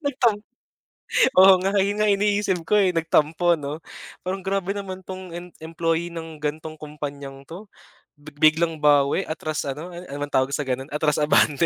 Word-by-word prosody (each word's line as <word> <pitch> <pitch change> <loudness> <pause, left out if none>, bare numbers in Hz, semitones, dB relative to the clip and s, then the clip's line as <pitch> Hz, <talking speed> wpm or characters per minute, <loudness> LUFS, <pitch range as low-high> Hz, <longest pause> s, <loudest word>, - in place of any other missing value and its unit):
Nag-tam 250 -6 +2 1.0
oo 190 +1 +9
nga 195 +2 0
yun 200 +2 +1
nga 210 - +3
iniisip 205 -2 +1
ko - - +1
eh, 190 -2 +3
nag-tampo 165 0 +2
'no? 150 -1 -5 0.5
Parang 190 +1 -3
grabe 195 0 -1
naman 190 -2 -6
'tong 185 -1 -8
em 175 +1 -7 0.2
employee 165 +1 -1
ng 160 -2 -8
ganong 155 +1 -4
kumpanyang 140 -2 -8
'to, 195 +5 -11 0.5
big 145 0 -14
biglang 160 +2 +3
bawi, 145 +3 +3
atras 155 -1 -4
ano, 145 +5 -5
an 175 0 -9
ano 140 -4 -7
bang 145 - -5
tawag 130 +1 +2
sa 145 - -1
gano'n 130 +2 -3
atras 150 -1 +1
abante. 150 +1 +3
165 Hz, 170 wpm, -23 LUFS, 150-190 Hz, 1.0 s, oo